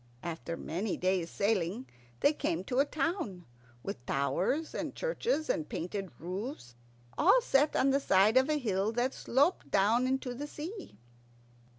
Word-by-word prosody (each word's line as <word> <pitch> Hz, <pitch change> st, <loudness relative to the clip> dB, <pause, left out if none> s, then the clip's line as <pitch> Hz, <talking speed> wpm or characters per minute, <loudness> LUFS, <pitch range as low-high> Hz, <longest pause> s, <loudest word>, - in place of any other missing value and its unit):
And 170 Hz, -, -2 dB
after 165 Hz, +1 st, -6 dB
many 185 Hz, +5 st, -3 dB
days' 185 Hz, -2 st, 0 dB
sailing 200 Hz, +2 st, 0 dB, 0.4 s
they 290 Hz, -, +5 dB
came 175 Hz, -, -1 dB
to 250 Hz, +6 st, -1 dB
a 280 Hz, -, +5 dB
town, 300 Hz, -, -2 dB, 0.4 s
with 120 Hz, -, -5 dB
towers 190 Hz, -, 0 dB
and -, -, -4 dB
churches 485 Hz, -9 st, -1 dB
and 155 Hz, -, -1 dB
painted 190 Hz, +3 st, -4 dB
roofs, 185 Hz, -, -6 dB, 0.5 s
all 390 Hz, +10 st, +6 dB
set 295 Hz, -, +2 dB
on 270 Hz, +1 st, +3 dB
the 275 Hz, -, +3 dB
side 200 Hz, -3 st, +4 dB
of 260 Hz, +3 st, +5 dB
a 305 Hz, -, +2 dB
hill 210 Hz, -5 st, 0 dB
that 245 Hz, +3 st, 0 dB
sloped 285 Hz, +8 st, +1 dB
down 220 Hz, +6 st, +3 dB
into 260 Hz, -1 st, -1 dB
the 285 Hz, +4 st, -5 dB
sea. 335 Hz, -, -8 dB
240 Hz, 160 wpm, -31 LUFS, 185-290 Hz, 0.5 s, all